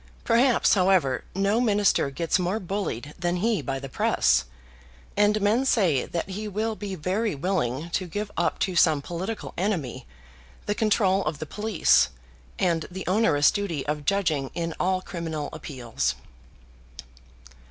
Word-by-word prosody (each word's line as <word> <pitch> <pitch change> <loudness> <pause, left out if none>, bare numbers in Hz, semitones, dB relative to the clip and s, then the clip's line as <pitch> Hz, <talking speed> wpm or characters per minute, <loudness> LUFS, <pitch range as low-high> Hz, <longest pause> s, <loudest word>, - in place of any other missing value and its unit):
Perhaps, 240 +2 +4
however, 185 - +2
no 200 +4 +2
minister 205 - +2
gets 165 +6 0
more 180 +4 0
bullied 175 - -4
than 175 0 0
he 215 +4 +1
by 135 -1 -3
the 135 0 -6
press, 65 - +2 0.7
and 210 +1 +3
men 215 +6 +3
say 190 - +2
that 170 +2 -3
he 210 +3 -4
will 215 +2 -2
be 205 -2 -5
very 190 +5 -1
willing 155 -2 -2
to 185 +1 -1
give 205 +4 -4
up 170 - 0
to 185 -2 -1
some 155 -4 +4
political 185 +7 -5
enemy 175 - -2 0.6
the 205 - 0
control 200 -3 +2
of 150 0 -2
the 155 - -5
police, 210 +3 +2 0.5
and 170 -3 0
the 190 +1 -7
onerous 170 -7 +3
duty 180 -9 -3
of 150 0 -2
judging 155 -8 0
in 165 -1 -2
all 185 0 +1
criminal 160 -4 -4
appeals. 125 -6 -3
185 Hz, 145 wpm, -25 LUFS, 150-205 Hz, 0.7 s, Perhaps